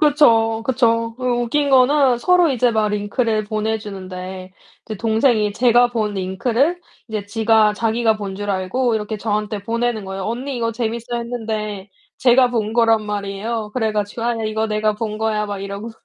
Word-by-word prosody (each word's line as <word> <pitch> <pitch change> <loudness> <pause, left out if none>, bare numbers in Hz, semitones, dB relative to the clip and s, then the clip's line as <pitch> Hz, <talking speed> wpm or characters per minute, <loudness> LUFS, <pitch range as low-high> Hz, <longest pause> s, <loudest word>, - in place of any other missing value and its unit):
그쵸. 225 -7 +4
그쵸. 230 -3 +1
그리고 250 -1 0
웃긴 285 +4 0
거는 265 -1 +4
서로 355 +4 +4
이제 245 -2 +2
막 215 -1 +1
링크를 215 +2 -1
보내 220 +1 -1
주는데 185 -2 -8 0.3
이제 215 - -6
동생이 220 0 +2
제가 245 +2 +4
본 215 -3 -1
링크를 230 - 0 0.3
이제 215 -3 -4
지가 220 0 +3
자기가 225 +1 +1
본 200 -2 -5
줄 205 +1 -4
알고 210 +6 0
이렇게 215 0 -4
저한테 210 -1 -2
보내는 230 -1 -1
거에요. 190 0 -5
"언니 250 +5 -3
이거 230 -1 -1
재밌어." 235 +1 -3
했는데 220 -4 -4 0.3
제가 250 0 +4
본 220 -3 -1
거란 225 -2 +3
말이에요. 210 +2 -3
그래 220 -3 -1
가지고 210 +2 -3
"아 240 0 +1
이거 220 +1 -1
내가 215 0 0
본 215 -1 -3
거야." 215 -1 -1
막 205 -1 -4
이러고 200 +3 -6
220 Hz, 350 characters per minute, -20 LUFS, 210-240 Hz, 0.3 s, 그쵸